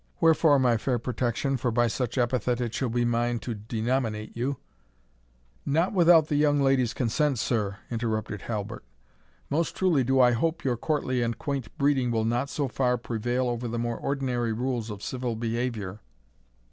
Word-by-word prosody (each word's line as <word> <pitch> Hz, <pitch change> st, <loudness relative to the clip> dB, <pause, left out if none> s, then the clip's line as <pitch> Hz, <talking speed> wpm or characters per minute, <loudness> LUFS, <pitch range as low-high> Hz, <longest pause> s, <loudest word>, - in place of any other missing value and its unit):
Wherefore, 160 Hz, -2 st, +5 dB
my 125 Hz, -3 st, +3 dB
fair 125 Hz, +2 st, 0 dB
Protection, 125 Hz, +3 st, -1 dB
for 125 Hz, 0 st, -1 dB
by 120 Hz, +1 st, +2 dB
such 120 Hz, +2 st, -2 dB
epithet 125 Hz, -1 st, +1 dB
it 120 Hz, -2 st, -2 dB
shall 130 Hz, -, -1 dB
be 120 Hz, +1 st, +1 dB
mine 120 Hz, 0 st, +1 dB
to 120 Hz, -, -4 dB
denominate 110 Hz, 0 st, -2 dB
you 130 Hz, +4 st, -2 dB, 0.6 s
" -, -, -37 dB, 0.2 s
"Not 165 Hz, +8 st, +1 dB
without 170 Hz, -4 st, +6 dB
the 145 Hz, -, 0 dB
young 145 Hz, -1 st, +3 dB
lady's 135 Hz, -4 st, +2 dB
consent, 135 Hz, +3 st, +1 dB
sir!" 105 Hz, -3 st, -1 dB
interrupted 110 Hz, -3 st, -2 dB
Halbert; 110 Hz, -, -5 dB, 0.7 s
"most 160 Hz, +3 st, 0 dB
truly 175 Hz, -8 st, +2 dB
do 130 Hz, +2 st, +2 dB
I 125 Hz, -1 st, +6 dB
hope 165 Hz, +8 st, 0 dB
your 125 Hz, -3 st, +1 dB
courtly 130 Hz, -1 st, -1 dB
and 115 Hz, -1 st, -1 dB
quaint 140 Hz, -6 st, -4 dB
breeding 140 Hz, -4 st, +2 dB
will 110 Hz, -2 st, 0 dB
not 120 Hz, +4 st, 0 dB
so 145 Hz, -1 st, -1 dB
far 125 Hz, 0 st, +1 dB
prevail 120 Hz, +2 st, -1 dB
over 120 Hz, 0 st, -2 dB
the 120 Hz, +1 st, -3 dB
more 120 Hz, 0 st, -2 dB
ordinary 125 Hz, -4 st, -1 dB
rules 120 Hz, -1 st, -2 dB
of 105 Hz, -1 st, -7 dB
civil 125 Hz, -2 st, -3 dB
behaviour." 115 Hz, -3 st, -3 dB
120 Hz, 170 wpm, -27 LUFS, 115-135 Hz, 0.7 s, without